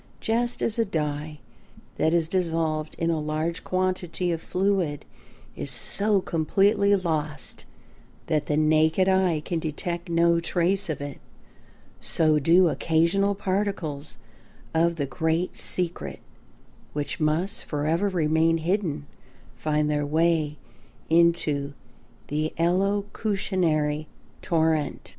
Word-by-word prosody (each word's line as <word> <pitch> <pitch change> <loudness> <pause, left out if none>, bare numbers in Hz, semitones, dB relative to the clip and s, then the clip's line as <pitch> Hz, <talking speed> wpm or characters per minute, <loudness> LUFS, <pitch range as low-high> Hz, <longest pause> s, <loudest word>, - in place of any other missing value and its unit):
Just 240 +2 -1
as 230 +1 +1
a - - +5
dye 150 -5 -3 0.6
that 160 - +2
is 170 -1 +2
dissolved 160 -3 -1
in 165 0 0
a 160 - 0
large 155 +3 -2
quantity 185 -1 -1
of 165 -1 -2
fluid 180 -6 0 0.5
is - - -3
so 200 +9 +1
completely 200 +5 +2
lost 155 -5 -3 0.6
that 155 -2 0
the 150 - +1
naked 155 +4 +3
eye 190 -5 +2
can 170 - -1
detect 170 +2 -4
no 170 0 +3
trace 180 +3 0
of 155 - -3
it, 145 -1 -6 0.8
so 155 -2 +2
do 170 +5 +5
occasional 170 +6 +2
particles 185 -7 -2 0.6
of 170 +1 +2
the 145 -3 -1
great 160 +5 -1
secret 175 -2 -2 0.7
which 145 -1 -3
must 160 +5 0
forever 160 +6 0
remain 165 -2 +2
hidden 165 -3 -1 0.5
find 150 -1 0
their 150 -1 0
way 155 0 +1 0.5
into 160 -4 +2 0.5
the 155 +2 -1
elocutionary 185 -4 0 0.3
torrent. 160 -2 0
165 Hz, 110 wpm, -25 LUFS, 155-185 Hz, 0.8 s, a